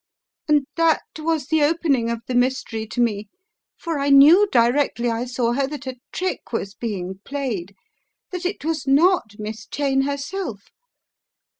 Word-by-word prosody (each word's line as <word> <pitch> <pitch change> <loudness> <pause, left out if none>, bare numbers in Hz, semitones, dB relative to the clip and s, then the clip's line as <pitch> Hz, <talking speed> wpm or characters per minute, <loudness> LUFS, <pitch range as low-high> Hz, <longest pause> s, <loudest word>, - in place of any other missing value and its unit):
And 295 -2 +3
that 330 -2 +3 0.2
was 310 -3 -1
the 315 +1 +1
opening 290 -6 +2
of 235 -1 -3
the 255 - -4
mystery 245 -3 0
to 245 - -6
me, 215 -4 0 0.5
for 330 -4 -3
I 280 +1 0
knew 305 +9 +8
directly 240 -1 +2
I 230 +2 -2
saw 245 -1 -1
her 270 +2 0
that 285 -1 -7
a 260 -1 -6
trick 370 +4 -3
was 200 -4 -3
being 190 -5 -5
played; 230 -10 -4 0.6
that 360 -1 -5
it 365 -4 -3
was 320 -2 -2
not 290 - +3
Miss 215 +1 -7
Cheyne 275 -2 0
herself. 280 - -4
270 Hz, 155 wpm, -22 LUFS, 230-305 Hz, 0.6 s, knew